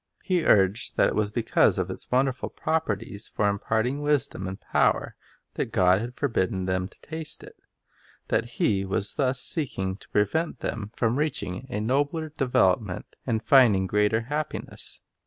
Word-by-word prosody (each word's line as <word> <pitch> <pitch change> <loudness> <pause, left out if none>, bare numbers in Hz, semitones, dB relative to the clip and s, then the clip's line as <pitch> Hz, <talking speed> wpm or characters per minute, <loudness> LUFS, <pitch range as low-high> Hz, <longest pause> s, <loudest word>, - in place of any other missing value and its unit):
He 180 -4 +1
urged 100 +2 +3
that - - +4
it - - -3
was 105 -1 +1
because 115 +1 +2
of - - -1
its - - -8
wonderful 130 0 +1
properties 105 -9 -2
for 105 - 0
imparting 110 +7 0
wisdom 145 -10 0
and 95 +1 -6
power - - +1 0.4
that - - -3
God 90 +2 +4
had 120 +2 -6
forbidden 95 -8 0
them 95 0 -1
to - - -22
taste 160 0 -5
it; - - -12 0.7
that - - +1
He 100 -2 +2
was 100 +1 -1
thus 130 -2 +1
seeking 95 - -1
to - - -18
prevent 130 - 0
them 105 -2 -3
from 120 +3 +1
reaching 150 -11 -1
a 90 - -6
Reason, 105 +1 -2
nobler 145 +5 0
development 105 - 0
and 110 -1 0
finding 115 -9 +5
greater 105 +3 +2
happiness. 150 +6 -5
110 Hz, 160 wpm, -26 LUFS, 100-140 Hz, 0.7 s, finding